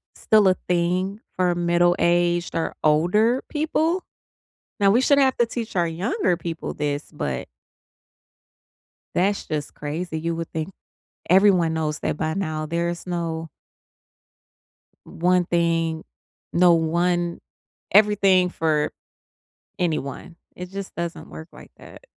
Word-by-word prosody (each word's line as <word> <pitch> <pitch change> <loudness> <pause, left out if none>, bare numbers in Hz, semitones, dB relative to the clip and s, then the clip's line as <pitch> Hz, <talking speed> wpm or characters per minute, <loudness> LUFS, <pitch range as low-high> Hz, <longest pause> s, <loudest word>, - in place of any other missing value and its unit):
still 215 -2 +4
a 185 - +5 0.2
thing 180 +3 0 0.2
for 180 -1 +1
middle-aged 175 0 +2
or 165 - -2
older 180 +11 +3
people. 320 +3 0 0.8
Now 200 -2 +4
we 230 +5 +4
shouldn't 280 +1 +4
have 265 -1 +1
to 240 - +3
teach 230 -1 -5
our 170 -1 +2
younger 175 +1 0
people 165 -1 -5
this, 145 0 -3
but - - -4 1.7
that's 195 +3 +1
just 150 -2 -4
crazy, 160 +3 -4
you 165 +1 -2
would 165 0 -5
think 160 +2 -3 0.6
everyone 185 -3 +4
knows 155 -2 -2
that - - -2
by 155 0 -2
now, 155 -5 -3
there 170 +2 -1
is 175 +1 -5
no 165 -2 -3 1.6
one 180 +1 +1
thing 165 -2 0 0.5
no, 175 0 +5
one 170 +1 0 0.5
everything 195 -3 +4
for 155 -3 0 0.9
anyone. 165 0 -3 0.2
It 180 0 -8
just 195 0 -6
doesn't 170 0 -5
work 160 - -9
like - - -14
that. - - -14
175 Hz, 125 wpm, -23 LUFS, 165-190 Hz, 1.7 s, a